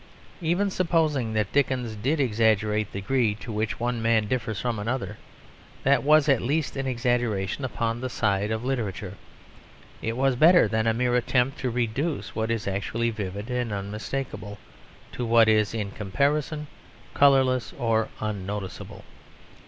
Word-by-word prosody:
Even 175 Hz, +5 st, +1 dB
supposing 155 Hz, -10 st, +1 dB
that 105 Hz, -2 st, 0 dB
Dickens 125 Hz, -5 st, 0 dB
did 135 Hz, +9 st, 0 dB
exaggerate 110 Hz, -3 st, +1 dB
the 100 Hz, -, -5 dB
degree 115 Hz, -1 st, +1 dB
to 110 Hz, +3 st, -8 dB
which 110 Hz, 0 st, -2 dB
one 120 Hz, 0 st, -1 dB
man 115 Hz, -2 st, +2 dB
differs 110 Hz, -3 st, -2 dB
from 120 Hz, -3 st, -2 dB
another 120 Hz, +5 st, -3 dB, 0.6 s
that 140 Hz, +1 st, +4 dB
was 150 Hz, +1 st, +5 dB
at 135 Hz, -4 st, +4 dB
least 145 Hz, +4 st, -1 dB
an 135 Hz, -1 st, -2 dB
exaggeration 120 Hz, -3 st, -1 dB
upon 115 Hz, -1 st, -2 dB
the 130 Hz, -, -3 dB
side 100 Hz, -3 st, 0 dB
of 110 Hz, +2 st, -2 dB
literature; 105 Hz, -7 st, -3 dB, 0.9 s
it 115 Hz, +1 st, -3 dB
was 135 Hz, 0 st, +2 dB
better 165 Hz, 0 st, +6 dB
than 110 Hz, +1 st, 0 dB
a -, -, +5 dB
mere 125 Hz, +1 st, +1 dB
attempt 125 Hz, +2 st, +1 dB
to 130 Hz, -, -1 dB
reduce 125 Hz, +6 st, -2 dB
what 110 Hz, 0 st, -2 dB
is 115 Hz, -3 st, -2 dB
actually 110 Hz, +4 st, -1 dB
vivid 105 Hz, +1 st, -5 dB
and 125 Hz, -2 st, -1 dB
unmistakable 105 Hz, +2 st, -5 dB, 0.5 s
to 125 Hz, -, -4 dB
what 115 Hz, -1 st, +5 dB
is 110 Hz, -2 st, +3 dB
in 105 Hz, -3 st, -3 dB
comparison 145 Hz, -, -1 dB, 0.5 s
colourless 130 Hz, -3 st, +4 dB
or 115 Hz, -2 st, +1 dB
unnoticeable. 105 Hz, -2 st, -5 dB
115 Hz, 150 wpm, -26 LUFS, 105-135 Hz, 0.9 s, better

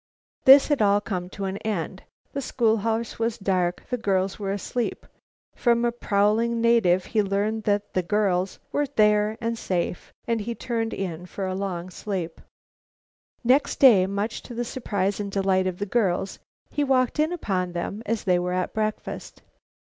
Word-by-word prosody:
This 270 Hz, +3 st, +9 dB
had 290 Hz, -5 st, +2 dB
all 205 Hz, -1 st, +4 dB
come 185 Hz, -4 st, -4 dB
to 195 Hz, +1 st, -5 dB
an 190 Hz, +1 st, -3 dB
end. 190 Hz, -4 st, -3 dB, 0.3 s
The 280 Hz, -, -2 dB
schoolhouse 225 Hz, -2 st, 0 dB
was 230 Hz, 0 st, 0 dB
dark 180 Hz, -3 st, 0 dB
the 250 Hz, -, +1 dB
girls 195 Hz, -3 st, 0 dB
were 195 Hz, -1 st, -2 dB
asleep. 225 Hz, +4 st, -3 dB, 0.5 s
From 235 Hz, -1 st, +2 dB
a 240 Hz, -, +2 dB
prowling 230 Hz, +1 st, +1 dB
native 225 Hz, -6 st, +3 dB
he 220 Hz, -, +1 dB
learned 205 Hz, +2 st, -1 dB
that 205 Hz, 0 st, 0 dB
the 185 Hz, -, +2 dB
girls 190 Hz, -1 st, 0 dB
were 290 Hz, 0 st, 0 dB
there 210 Hz, -4 st, +2 dB
and 230 Hz, 0 st, -2 dB
safe, 175 Hz, -1 st, -2 dB
then 230 Hz, -1 st, 0 dB
he 230 Hz, +3 st, -4 dB
turned 230 Hz, -2 st, -2 dB
in 180 Hz, -2 st, -5 dB
for 195 Hz, +2 st, -5 dB
a 185 Hz, -, -2 dB
long 185 Hz, -2 st, -4 dB
sleep. 180 Hz, -4 st, -5 dB, 1.0 s
Next 260 Hz, +4 st, +3 dB
day, 210 Hz, -9 st, +7 dB
much 200 Hz, +3 st, -3 dB
to 240 Hz, -, -10 dB
the 240 Hz, +1 st, -2 dB
surprise 205 Hz, -6 st, -2 dB
and 200 Hz, -1 st, -4 dB
delight 190 Hz, -1 st, +1 dB
of 180 Hz, -1 st, -3 dB
the 205 Hz, -, -2 dB
girls, 195 Hz, -3 st, 0 dB, 0.3 s
he 290 Hz, -, 0 dB
walked 260 Hz, 0 st, +1 dB
in 310 Hz, +2 st, +2 dB
upon 185 Hz, -, -2 dB
them 185 Hz, +5 st, -4 dB
as 225 Hz, 0 st, -1 dB
they 180 Hz, -2 st, +3 dB
were 180 Hz, 0 st, -2 dB
at 180 Hz, 0 st, -1 dB
breakfast. 215 Hz, -1 st, -4 dB
205 Hz, 170 wpm, -25 LUFS, 190-230 Hz, 1.0 s, This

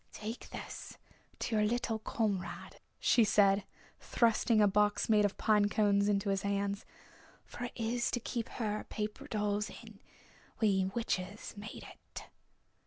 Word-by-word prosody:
"Take 220 Hz, +3 st, -6 dB
this -, -, -8 dB, 0.4 s
to 230 Hz, -, -2 dB
your 210 Hz, -, +3 dB
little 225 Hz, 0 st, 0 dB
comrade," 210 Hz, -4 st, -2 dB, 0.2 s
shes 225 Hz, -4 st, +4 dB
said, 195 Hz, -1 st, +4 dB, 0.3 s
thrusting 230 Hz, -1 st, +2 dB
a 210 Hz, -, +6 dB
box 205 Hz, +2 st, +2 dB
made 210 Hz, -1 st, +5 dB
of 205 Hz, -, -1 dB
pine 210 Hz, -2 st, +3 dB
cones 205 Hz, -1 st, +3 dB
into 200 Hz, 0 st, +1 dB
his 195 Hz, -1 st, 0 dB
hands. 200 Hz, 0 st, -1 dB, 0.6 s
"It's -, -, -26 dB
for -, -, -8 dB
her 235 Hz, +1 st, -1 dB
to 245 Hz, -, 0 dB
keep 235 Hz, 0 st, -4 dB
her 215 Hz, -3 st, -2 dB
paper 215 Hz, +6 st, -4 dB
dolls 210 Hz, -3 st, -1 dB
in. 220 Hz, -3 st, -12 dB, 0.6 s
We 195 Hz, -4 st, +3 dB
witches 200 Hz, -1 st, -3 dB
made 205 Hz, +1 st, -8 dB
it." -, -, -11 dB
210 Hz, 145 wpm, -33 LUFS, 200-225 Hz, 0.6 s, a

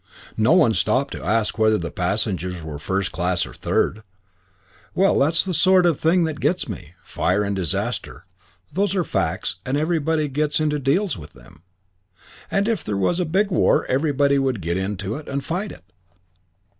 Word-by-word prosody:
No 110 Hz, +7 st, +3 dB
one 150 Hz, -11 st, +5 dB
stopped 130 Hz, +5 st, +1 dB
to -, -, -7 dB
ask 110 Hz, 0 st, 0 dB
whether 110 Hz, 0 st, +4 dB
the 85 Hz, -3 st, -5 dB
passengers 90 Hz, -2 st, -1 dB
were 75 Hz, -2 st, -6 dB
first 95 Hz, +4 st, -1 dB
class 90 Hz, 0 st, 0 dB
or -, -, -11 dB
third. 110 Hz, -, 0 dB, 0.9 s
Well, 195 Hz, +1 st, +3 dB
that's 160 Hz, +6 st, +3 dB
the 185 Hz, -, -2 dB
sort 185 Hz, +1 st, +4 dB
of 170 Hz, -5 st, +2 dB
thing 170 Hz, +2 st, +3 dB
that 160 Hz, -2 st, -3 dB
gets 180 Hz, -, 0 dB
me. 85 Hz, 0 st, -8 dB
Fire 95 Hz, +3 st, 0 dB
and 100 Hz, 0 st, -1 dB
disaster 90 Hz, -2 st, -3 dB, 0.5 s
those 195 Hz, +2 st, 0 dB
are 185 Hz, -, +2 dB
facts 85 Hz, -, -1 dB
and 130 Hz, +2 st, -1 dB
everybody 155 Hz, -1 st, 0 dB
gets 150 Hz, +2 st, 0 dB
to 155 Hz, -, +1 dB
and 150 Hz, -2 st, -1 dB
deals 155 Hz, -, +1 dB
with 75 Hz, -, -12 dB
them. 80 Hz, -2 st, -18 dB, 0.9 s
And 200 Hz, +2 st, +1 dB
if 225 Hz, -8 st, 0 dB
there 100 Hz, -, -2 dB
was 135 Hz, -, +1 dB
a 180 Hz, -, +1 dB
big 195 Hz, +6 st, +1 dB
war 175 Hz, -, +3 dB
everybody 140 Hz, 0 st, +2 dB
would 130 Hz, -5 st, 0 dB
get 95 Hz, +4 st, -2 dB
to 100 Hz, +5 st, -4 dB
and 140 Hz, -2 st, -5 dB
fight 190 Hz, +5 st, -3 dB
it. -, -, -13 dB
135 Hz, 180 wpm, -22 LUFS, -, 0.9 s, one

